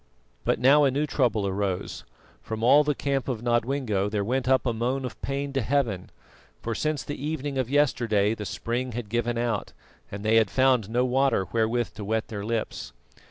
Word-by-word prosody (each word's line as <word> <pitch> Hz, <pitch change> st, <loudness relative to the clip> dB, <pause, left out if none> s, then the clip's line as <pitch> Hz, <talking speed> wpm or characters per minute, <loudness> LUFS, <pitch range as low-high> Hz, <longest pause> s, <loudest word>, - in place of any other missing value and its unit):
But -, -, +2 dB
now 140 Hz, +5 st, +5 dB
a 140 Hz, -, +5 dB
new 140 Hz, +3 st, 0 dB
trouble 120 Hz, -8 st, +1 dB
arose: 95 Hz, -1 st, -3 dB, 0.4 s
from 110 Hz, 0 st, -5 dB
all 145 Hz, +5 st, +6 dB
the 150 Hz, -1 st, 0 dB
camp 135 Hz, -1 st, -1 dB
of 120 Hz, -4 st, -3 dB
Nodwengo 120 Hz, -4 st, 0 dB
there 105 Hz, -1 st, -1 dB
went 130 Hz, +4 st, -1 dB
up 130 Hz, 0 st, +3 dB
a 120 Hz, -, +1 dB
moan 125 Hz, +4 st, -1 dB
of 125 Hz, -, -8 dB
pain 140 Hz, 0 st, -3 dB
to 135 Hz, -, +1 dB
Heaven, 115 Hz, -6 st, -1 dB, 0.5 s
for 115 Hz, -, -3 dB
since 155 Hz, +4 st, -1 dB
the 145 Hz, -1 st, -6 dB
evening 145 Hz, -3 st, -2 dB
of 125 Hz, -2 st, -1 dB
yesterday 115 Hz, -7 st, +2 dB
the 105 Hz, -2 st, -6 dB
spring 125 Hz, +1 st, -3 dB
had 115 Hz, -2 st, -5 dB
given 120 Hz, +1 st, -1 dB
out, 115 Hz, -3 st, -2 dB, 0.4 s
and 100 Hz, +1 st, -6 dB
they 110 Hz, +1 st, +4 dB
had 110 Hz, -3 st, +4 dB
found 130 Hz, -5 st, +2 dB
no 120 Hz, +2 st, +1 dB
water 130 Hz, -5 st, +2 dB
wherewith 115 Hz, +1 st, 0 dB
to 105 Hz, -, -7 dB
wet 110 Hz, +2 st, -1 dB
their 105 Hz, -3 st, -5 dB
lips. 110 Hz, -, -3 dB
120 Hz, 195 wpm, -26 LUFS, 110-135 Hz, 0.5 s, all